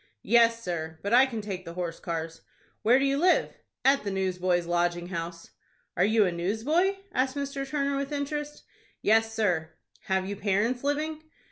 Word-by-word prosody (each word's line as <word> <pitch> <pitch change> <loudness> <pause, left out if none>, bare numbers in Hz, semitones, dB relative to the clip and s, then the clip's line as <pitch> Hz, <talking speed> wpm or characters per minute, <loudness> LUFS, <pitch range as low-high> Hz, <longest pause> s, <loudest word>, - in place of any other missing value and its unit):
"Yes, 230 0 +4
sir; 160 -3 -4
but 200 - -1
I 260 +2 +7
can 230 -4 -4
take 195 -3 -5
the 170 -1 -9
horse 175 -2 -4
cars." 165 -2 -5 0.4
"Where 235 +4 +5
do 270 - +2
you 275 +1 +1
live?" 360 +3 +3 0.3
"At 275 +1 +4
the 205 - -2
Newsboys' 185 -2 0
Lodging 175 0 0
House." 170 -1 -6 0.4
"Are 180 - +3
you 215 +1 +4
a 180 - 0
newsboy?" 225 - +1 0.2
asked 260 +1 0
Mr. 280 -1 -3
Turner, 280 -1 0
with 280 +1 -3
interest. 295 +1 -4 0.4
"Yes, 225 +1 +3
sir." 180 -8 0 0.3
"Have 190 0 0
you 200 - -3
parents 210 +6 0
living?" 305 +2 -1
215 Hz, 170 wpm, -28 LUFS, 180-275 Hz, 0.4 s, I